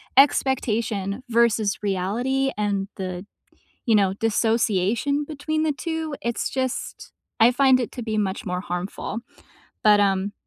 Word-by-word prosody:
expectation 230 -6 +2
versus 225 -3 +2
reality, 230 +8 0
and 200 -2 -1
the 185 -2 -4
d - - -24 0.6
you 230 - +4
know, 195 -2 +3
dissociation 225 +4 +1
between 310 +1 -2
the 315 - +2
2, 320 0 -4
it's 235 0 -2
just 260 -1 -4 0.3
I 230 +2 +7
find 260 0 +4
it 245 - -3
to 245 - -5
be 220 -1 -2
much 195 -2 -1
more 180 0 -2
harmful. 185 +4 -4 0.6
But, 210 -1 +6
um, 195 0 +1
225 Hz, 140 wpm, -24 LUFS, 200-265 Hz, 0.6 s, I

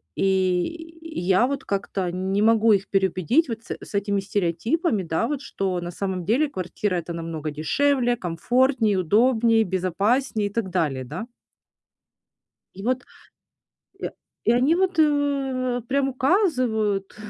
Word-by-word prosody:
И 190 - 0 0.2
и - - -2
я 190 +6 +3
вот 275 0 -3
как-то 195 -2 -2
не 190 +2 -1
могу 225 0 +5
их 195 -1 0
переубедить 195 - +2
вот 230 -2 -5
с - - -5
с - - -12
этими 200 0 0
стереотипами, 205 - 0
да, 165 +7 -1
вот, 290 -2 -3
что 190 -9 -2
на 175 - -5
самом 185 -1 -3
деле 270 - +2
квартира- 185 -2 -3
это 170 -1 -3
намного 165 -2 -4
дешевле, 245 - +1
комфортнее, 225 - +1
удобнее, 225 +4 +3
безопаснее 205 +5 0
и - - -18
так 225 -5 -2
далее, 150 -8 -1
да. 160 - -6 1.5
И 195 - -9
вот. 255 +2 0 1.0
И - - -3 0.3
и - - +3
они, 255 +6 +3
вот, 370 -1 0
у, 275 -5 +1
прям 270 0 +1
указывают, 255 - +1
215 Hz, 140 wpm, -24 LUFS, 185-260 Hz, 1.5 s, могу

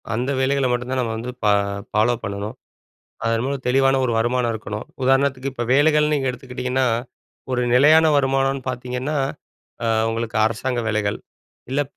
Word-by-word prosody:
அந்த 125 +4 -1
வேலைகள 135 +1 +1
மட்டும் 125 +1 -2
தான் 130 -1 0
நம்ம 115 -2 -2
வந்து 120 +3 -5
பா 105 - +5 0.4
ஃபாலோப் 115 +3 +1
பண்ணனும். 100 +1 -5 0.7
அதன் 115 0 +1
மூலம் 135 -1 -3
தெளிவான 135 +1 +3
ஒரு 120 - 0
வருமானம் 120 +1 +1
இருக்கணும். 105 -1 -6 0.2
உதாரணத்துக்கு 135 0 +2
இப்ப 120 - -3
வேலைகள்னு 150 +1 +4
நீங்க 135 -2 0
எடுத்துக்கிட்டீங்கன்னா 125 0 -2 0.6
ஒரு 125 -1 +1
நிலையான 155 +5 +6
வருமானம்னு 135 0 +1
பார்த்தீங்கன்னா, 125 +4 -3 0.7
அ - - +1 0.2
உங்களுக்கு 115 0 -3
அரசாங்க 120 +3 -1
வேலைகள். 105 -1 -1 0.5
இல்ல 140 +2 +1
125 Hz, 145 wpm, -21 LUFS, 115-135 Hz, 0.7 s, நிலையான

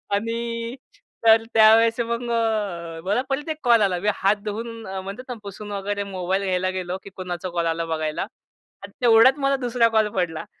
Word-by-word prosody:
आणि 230 +2 -3 0.5
तर 225 0 +7
त्यावेळेस 225 +1 +6
मग 235 +1 -1
अ, 200 -8 -1
मला 210 +6 +1
परत 295 +4 -2
एक 310 - -2
कॉल 235 -3 +5
आला. 185 -3 +1
मी 210 +3 +1
हात 195 +2 +2
धुवून 225 +1 -5
अ, 190 0 -4
म्हणतात 200 +6 -7
ना, - - -2
पुसून 205 +1 -8
वगैरे 200 0 -2
मोबाईल 190 0 -2
घ्यायला 185 -1 0
गेलो, 180 +1 -4
की 200 - -10
कुणाचा 180 -1 -5
कॉल 170 -1 -1
आला 165 0 -1
बघायला 155 -1 -2
आणि - - -16
तेवढ्यात 240 +4 +6
मला 275 0 +2
दुसरा 235 -1 +3
कॉल 215 -1 +3
पडला. 170 -4 -2
210 Hz, 180 wpm, -23 LUFS, 185-230 Hz, 0.5 s, तर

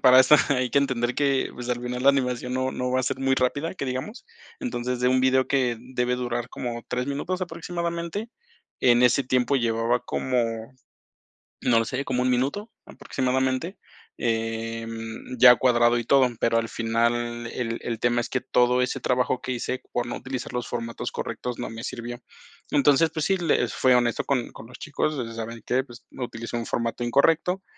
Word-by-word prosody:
para 130 0 +8
eso 150 +4 +7
hay 130 -3 +1
que 140 - +4
entender 125 -3 0
que, 140 -2 +1
pues, 125 0 -7
al 120 -1 -1
final, 125 +1 -3
la 140 - +8
animación 125 -2 -1
no 130 0 0
no 125 0 -2
va 130 - +2
a - - -3
ser 130 - -2
muy 135 0 +2
rápida, 140 +7 0
que 140 - -4
digamos. 130 - -5 0.4
Entonces, 125 - -3
de 125 - +3
un 130 0 +3
video 130 0 +3
que 130 -4 +1
debe 125 0 -1
durar 120 -1 -3
como 120 -2 -5
3 125 +2 -2
minutos 175 +7 -2
aproximadamente, 170 +4 -4 0.5
en 120 -1 +5
ese 125 +2 +4
tiempo 130 +2 +2
llevaba 115 0 +1
como, 115 -2 -2 0.9
no 115 -2 +3
sé, 135 +3 -3
como 125 -1 0
un 125 - +2
minuto, 140 - -1
aproximadamente, 130 +7 -1 0.4
eh, 115 0 -2
mm, 115 +2 -7
ya 125 0 +9
cuadrado 120 -1 +3
y 120 - -1
todo. 135 -1 +5
Pero, 115 0 +2
al 115 0 0
final, 120 +1 -1
el 115 -1 -3
el 115 -2 -4
tema 120 0 +2
es - - -6
que 130 - -1
todo 125 +1 +2
ese 125 - -1
trabajo 125 0 0
que 130 - -3
hice, 125 +1 -3
por 120 0 0
no 120 - -4
utilizar 130 -2 -5
los 125 -1 -3
formatos 115 -1 -4
correctos, 125 -1 -4
no - - -3
me 115 +1 -8
sirvió. 120 +1 -6 0.5
Entonces, 145 +2 +4
pues 155 -2 -2
sí, 195 -1 +2
les 170 -3 +1
fui 130 -1 +4
honesto 120 -1 +2
con 130 -4 -1
con 115 - -12
los 125 - -12
chicos, 155 0 -1
o 130 - -2
sea, 115 - -8
saben 115 0 -6
que, 130 +2 +1
pues, 120 -2 -14
no, 130 - -4
utilicé 115 0 -6
un 115 - -3
formato 115 +1 -2
incorrecto. 165 +9 +2
125 Hz, 195 wpm, -25 LUFS, 120-135 Hz, 0.9 s, ya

